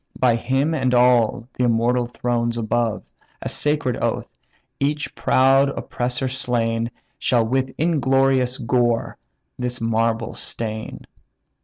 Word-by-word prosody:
By 125 -2 +3
him 135 +7 0
and 130 -5 +1
all 120 -1 +3
the 125 - 0
immortal 120 +1 +2
thrones 120 -1 -1
above 115 0 -1 0.4
(A - - -3
sacred 145 -5 0
oath), - - -1 0.5
each 150 +2 -1
proud 135 +1 +3
oppressor 125 -1 -3
slain, 115 -3 -1 0.3
Shall 120 -3 +2
with 130 +2 0
inglorious 135 -5 +2
gore 120 -1 0 0.4
this 125 0 -3
marble 115 0 0
stain." 110 -1 -6
125 Hz, 115 wpm, -22 LUFS, 115-130 Hz, 0.5 s, By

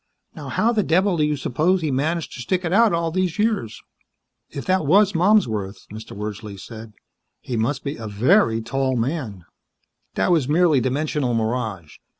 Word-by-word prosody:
"Now - - -8
how 230 - +1
the 220 -3 +1
devil 185 +1 +2
do 155 - +2
you 150 0 +1
suppose 160 +8 +1
he 155 -3 -1
managed 155 +5 -1
to 125 - -7
stick 180 +9 -1
it 170 - -1
out 225 +1 +5
all 165 -1 -1
these 185 -1 -1
years!" 210 - -1 0.7
"If 140 - -7
that 185 -5 +1
was 200 +5 +4
Malmsworth," 120 - +1
Mr. 110 -2 -9
Wordsley 105 -1 -6
said, 110 +1 -10 0.5
"he 125 - -5
must 120 +4 -1
be 140 +1 -4
a 110 - -7
very 115 - +2
tall 130 +2 -1
man." 115 - -3 0.7
"That 95 - +1
was 155 -6 +2
merely 160 -2 +4
dimensional 135 -1 -1
mirage. 110 -8 -3
140 Hz, 170 wpm, -22 LUFS, 115-175 Hz, 0.7 s, out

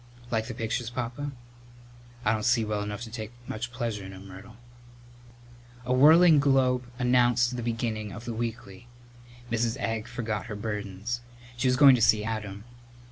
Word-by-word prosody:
"Like 110 -1 0
the 120 - -6
pictures, 115 +1 -2
Papa?" 125 +4 -4 0.9
"I 105 - +4
don't 110 - -1
see 115 0 +2
well 105 -1 -2
enough 105 +1 -5
to 115 -2 -7
take 110 0 -6
much 120 +2 -4
pleasure 115 -5 -3
in 95 0 -9
'em, 95 +1 -11
Myrtle." 95 +4 -12 1.3
A 125 - +1
whirling 155 +4 +7
globe 130 -3 +2
announced 125 0 +3
the 120 - -3
beginning 115 -2 -2
of 115 +4 -9
the 120 - -4
weekly. 115 -1 -5 0.6
Mrs. 115 0 0
Egg 115 0 -2
forgot 110 -3 -4
her 105 - -5
burdens. 105 +2 -4 0.3
She 125 +2 0
was 125 0 +3
going 140 -1 +9
to 125 - +2
see 105 -1 +4
Adam. 105 -2 -4
115 Hz, 165 wpm, -27 LUFS, 110-125 Hz, 1.3 s, going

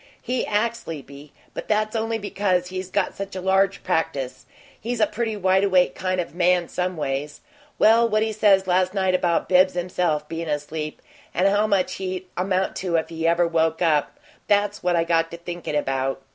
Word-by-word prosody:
He 250 0 -2
acts 230 +3 0
sleepy, 145 - -9 0.2
but - - -6
that's 215 +1 0
only 225 0 -1
because 190 -4 -1
he's 185 0 -5
got 195 0 0
such 195 -1 -7
a - - -3
large 190 +1 +1
practice 145 -7 -2 0.3
he's 240 +1 -3
a 215 - +5
pretty 220 0 -3
wide 190 0 +2
awake 185 -7 +3
kind 185 0 -2
of 175 - -3
a - - -18
man 180 -1 +2
some 180 -1 -2
ways. 145 0 -3 0.4
Well, 230 +2 +5
what 215 0 +2
he 220 0 -2
says 200 -2 +4
last 185 +1 +1
night 190 -1 +1
about 175 -2 +1
Bibbs 185 0 +4
himself 175 -4 -1
bein' 165 0 -5
asleep, 150 +1 -4 0.3
and 185 +3 +3
how 205 +2 +2
much 200 -3 0
he'd 185 -1 -4
amount 185 +1 0
to 180 -3 -2
if 160 - 0
he 165 0 -2
ever 170 +1 +3
woke 160 0 +1
up 155 - +1 0.3
that's 205 0 +1
what 180 0 +1
I 165 - +3
got 165 -1 +1
to 170 - -8
thinkin' 170 -2 -5
about. 135 -1 -1
185 Hz, 195 wpm, -23 LUFS, 165-200 Hz, 0.4 s, a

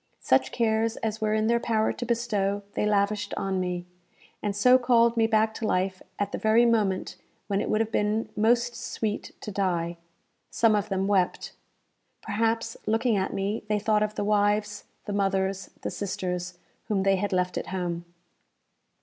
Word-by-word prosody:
Such 130 0 +2
cares 225 +1 +1
as 220 0 -3
were 215 0 +1
in 215 0 +1
their 235 +1 +3
power 220 -2 +1
to 245 - -5
bestow 205 -4 0
they 210 - 0
lavished 205 0 0
on 190 -1 -1
me; 180 -1 -2 0.6
and 205 -1 -2
so 250 +5 +6
called 235 -1 +4
me 225 -1 +3
back 220 0 +2
to 220 - -3
life 185 0 0 0.2
at 205 0 -2
the - - -3
very 220 +2 +4
moment 210 -5 +1 0.3
when 200 -1 0
it - - -3
would 215 - +2
have 225 0 -2
been 215 +1 0
most 235 +2 +2
sweet 220 -3 -4
to 210 - -6
die. 175 -3 -1 0.5
Some 225 -2 +3
of 205 0 -1
them 195 -1 0
wept. 195 -3 +1 0.7
Perhaps, 225 +1 -1
looking 225 +1 +2
at 190 -1 0
me, 200 +3 -2
they 210 - +2
thought 210 +1 +1
of 210 0 -1
the - - -1
wives, 205 0 +1 0.2
the 205 - -4
mothers, 195 -1 0
the - - -2
sisters, 180 -2 -4 0.3
whom 200 -3 0
they 195 0 +3
had 205 +2 -2
left 180 -1 0
at - - -3
home. 175 -2 -3
210 Hz, 175 wpm, -27 LUFS, 195-225 Hz, 0.7 s, so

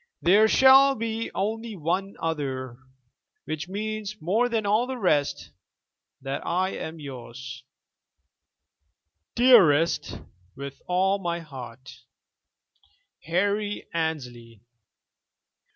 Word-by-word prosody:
There 205 +5 +6
shall 270 +3 +6
be 225 0 -3
only 220 +2 -3
one 185 +4 -2
other, 135 -6 -3 0.7
which 155 +2 -5
means 215 +1 -4
more 215 +10 +1
than 225 -3 -1
all 215 +5 +2
the 260 0 -4
rest: 155 - 0 0.7
that 135 0 -4
I 185 +2 0
am 160 -3 -6
yours, 130 -2 -9 1.7
dearest, 180 - +4 0.4
with 140 0 -8
all 190 +2 +1
my 170 -2 -2
heart, 130 -4 -11 1.3
"HARRY 205 +4 -1
ANNESLEY." 125 -9 -4
175 Hz, 90 wpm, -25 LUFS, 140-215 Hz, 1.7 s, There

